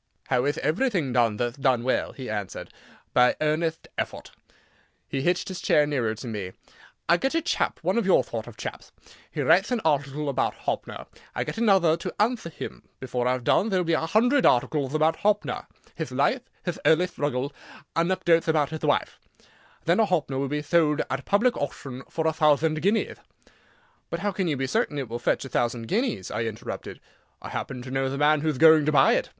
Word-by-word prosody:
"How 125 -1 +2
ith 145 - 0
everything 175 - 0
done 115 -4 +2
that'th 120 +4 -3
done 130 -3 +2
well?" 130 - 0
he 130 -2 -8
answered. 105 -3 -5 0.4
"By 125 0 +5
earnetht 160 +1 0
effort." - - -4 0.8
He 135 - -2
hitched 175 +4 +1
his 185 -2 -6
chair 150 - +4
nearer 125 -7 -1
to 115 +4 -8
me, 100 -5 -5 0.5
"I 170 - +5
get 270 - -1
a - - +4
chap—one 325 - 0
of 230 - -1
your 190 - +5
thort 115 -1 -6
of 115 -3 -11
chapth—he - - -8
writ'th 180 +6 +4
an 245 -2 0
article 145 -2 0
about 140 - 0
Hoppner. - - -4 0.3
I - - 0
get - - -5
another 195 -8 +4
to - - -5
anthwer 220 -4 +1
him. - - -8 0.2
Before 125 -1 -2
I've 125 -1 0
done 200 - +3
there'll 185 -3 +1
be 165 - +1
a 160 0 0
hundred 245 - +3
articleth 135 +3 +2
about 155 +1 +2
Hoppner—hith 210 0 -2
life, - - +1 0.2
hith 175 -2 -3
early 160 +3 +4
thruggie, 145 -5 -2 0.4
anecdo'th 170 -1 +2
about 155 -2 +2
hith 160 - -6
wife. - - 0 0.7
Then 170 +5 +3
a 220 - +5
Hoppner 155 -8 -1
will 140 - -1
be 150 +2 -2
thold 150 -1 +2
at 135 0 -3
public 230 +5 +3
auchtion 135 -2 -6
for 160 - -2
a 160 - +2
thouthand 155 +1 +2
guineath." 210 +4 0 0.9
"But - - -4
how 205 - 0
can 190 -1 -2
you 150 -4 0
be 135 - -1
certain 140 +2 0
it 135 -3 -3
will 120 +1 -4
fetch 120 - 0
a - - -8
thousand 120 -1 -1
guineas?" 225 - -1
I 115 - -2
interrupted. 110 -2 -6 0.4
"I - - -8
happen 125 -2 -5
to 130 - -8
know 135 0 0
the 135 - -4
man 150 +1 +3
whoth 155 -3 -1
going 160 0 +6
to - - +4
buy 150 - +5
it." - - 0
150 Hz, 195 wpm, -26 LUFS, 130-175 Hz, 0.9 s, going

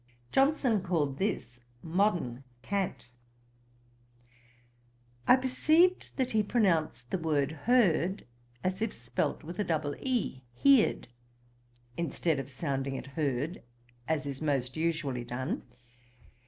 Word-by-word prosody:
Johnson 270 -6 +3
called 155 -7 -1
this 125 - -2 0.2
'modern 165 - 0 0.2
cant.' 195 -9 -2 2.2
I - - +9
perceived 310 +8 +3
that 260 -2 0
he 220 - +3
pronounced 165 - +1
the 190 - 0
word 150 -3 +1
heard, 190 - +2 0.4
as 185 +2 -1
if 225 - -1
spelt 115 +5 -2
with 170 +4 -8
a - - +3
double 155 -5 -1
e, 245 - -1
heerd, 275 - +4 0.9
instead 165 -2 0
of 135 0 -5
sounding 135 -1 -2
it - - -5
herd, 145 +3 -1 0.5
as 155 -2 0
is 140 0 -5
most 135 -4 0
usually 155 -6 -1
done. 125 +2 -3
165 Hz, 115 wpm, -30 LUFS, 135-210 Hz, 2.2 s, I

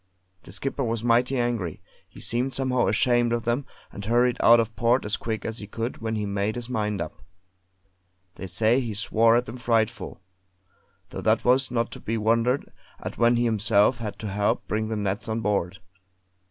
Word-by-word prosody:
The - - -13
Skipper 135 0 -3
was 115 -1 -2
mighty 120 +3 +2
angry; 120 -9 -1 0.3
he - - -14
seemed 125 +3 -1
somehow 130 -2 +1
ashamed 120 -1 +2
of 120 -1 0
them, 120 +4 -1 0.2
and 100 - -8
hurried 120 +3 +2
out 120 0 +7
of 115 -1 -1
port 120 +1 +2
as 105 - 0
quick 110 -1 -4
as 115 0 -4
he 105 - -8
could 115 +4 -4
when 110 0 -3
he 105 -1 -2
made 100 +1 -1
his 120 -1 -5
mind 105 -4 -1
up. - - -6 1.1
They 95 - -7
say 115 +6 +2
he 115 -5 -4
swore 115 +2 +3
at 120 +1 +2
them 130 - -8
frightful; 115 -4 -1 0.9
though - - -6
that - - +2
was 130 +2 +3
not 120 -1 -1
to - - -8
be 115 +1 -3
wondered 115 +4 +1 0.3
at - - -7
when 120 0 +4
he 120 - +1
himself 110 +1 +2
had 105 -3 -5
to 110 - -5
help 100 +1 0
bring 110 0 -1
the 110 - -2
nets 105 +2 -2
on 110 +1 -1
board. 100 -3 -1
115 Hz, 195 wpm, -25 LUFS, 105-120 Hz, 1.1 s, out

